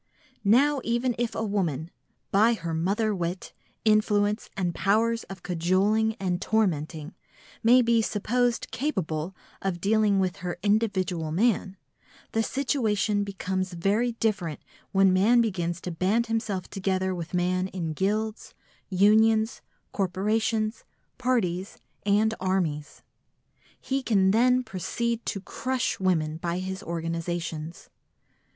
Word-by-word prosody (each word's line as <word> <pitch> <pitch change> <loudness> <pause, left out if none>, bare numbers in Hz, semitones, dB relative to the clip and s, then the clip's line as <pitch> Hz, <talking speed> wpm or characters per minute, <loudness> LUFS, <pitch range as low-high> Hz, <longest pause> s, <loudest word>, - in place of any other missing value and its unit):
Now 265 +7 +4
even 240 +2 0
if 240 -2 -1
a 220 - -1
woman, 170 -6 -1 0.4
by 220 +4 +4
her 170 -6 -4
mother 200 +7 0
wit, 180 0 -4 0.3
influence 210 0 +2
and 180 -3 0
powers 225 +5 +1
of 195 -2 -10
cajoling 190 +6 +1
and 185 -4 -2
tormenting, 160 -6 -1 0.5
may 245 +3 +6
be 230 -1 +3
supposed 240 +3 0
capable 185 - -2 0.3
of 190 -3 -2
dealing 205 +1 +3
with 190 0 0
her 180 -3 -4
individual 190 -6 0
man, 195 +1 +1 0.5
the 225 - +1
situation 220 -6 0
becomes 190 -1 -3
very 205 +8 +1
different 200 -9 -1 0.3
when 195 -1 +4
man 215 +6 +4
begins 175 -6 0
to 180 - -4
band 195 +8 +1
himself 220 -5 -2
together 190 -1 -1
with 175 0 -5
man 180 +1 +1
in 170 -4 -4
guilds, 215 +5 -2 0.3
unions, 220 +3 +3 0.3
corporations, 215 +3 0 0.4
parties 200 -8 0 0.3
and 215 +2 +3
armies. 175 -6 -2 0.8
He 270 0 -2
can 195 -6 +3
then 250 +4 +4
proceed 235 +3 -3
to 195 - -2
crush 255 +5 -2
women 160 -5 +1
by 170 +1 -2
his 190 0 -4
organisations. 165 -1 -4
195 Hz, 120 wpm, -27 LUFS, 180-225 Hz, 0.8 s, may